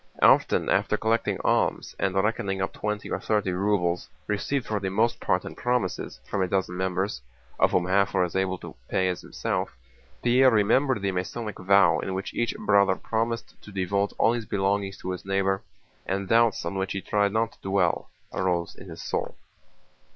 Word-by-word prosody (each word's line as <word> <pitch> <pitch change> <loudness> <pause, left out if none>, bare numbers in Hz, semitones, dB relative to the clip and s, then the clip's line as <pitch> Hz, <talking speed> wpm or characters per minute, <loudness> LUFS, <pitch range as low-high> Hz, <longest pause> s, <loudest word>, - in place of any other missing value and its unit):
Often - - +5
after - - +2
collecting 115 +1 +1
alms, - - +1
and 95 -1 0
reckoning 95 -1 0
up 95 - -2
twenty 105 0 -3
to - - -2
thirty 105 -1 0
rubles 90 -2 0 0.2
received 115 +5 -1
for 105 -1 -1
the 95 -1 -2
most 110 +5 +1
part 90 0 0
in - - -6
promises 125 -7 -2
from 100 - -1
a 95 - +2
dozen 90 -1 -1
members, 95 -3 -1 0.4
of - - +5
whom 90 - +1
half 100 +2 +2
were 95 - +4
as 90 - -3
well 95 - +2
able 95 -1 -1
to - - -10
pay 95 0 +1
as 90 - -3
himself, - - -3 0.5
Pierre 125 +2 +6
remembered 115 +1 +2
the 100 - +1
Masonic 100 +3 -4
vow 95 -4 +5
in 95 - -3
which 95 - -4
each 120 -1 -1
Brother 100 -2 +3
promised 115 +2 -2
to 105 - -12
devote 100 +1 0
all 115 - +4
his 115 -3 -4
belongings 100 0 0
to 95 - -5
his 90 - -5
neighbor, 95 0 0 0.5
and 95 0 -1
doubts 115 -3 +3
on 95 +3 -2
which 95 0 -2
he 95 - -3
tried 100 +1 +1
not 110 +1 0
to - - -23
dwell 95 -3 +1 0.2
arose 90 -2 0
in 95 - -12
his 80 0 -8
soul. - - -3
100 Hz, 190 wpm, -26 LUFS, 95-105 Hz, 0.5 s, Pierre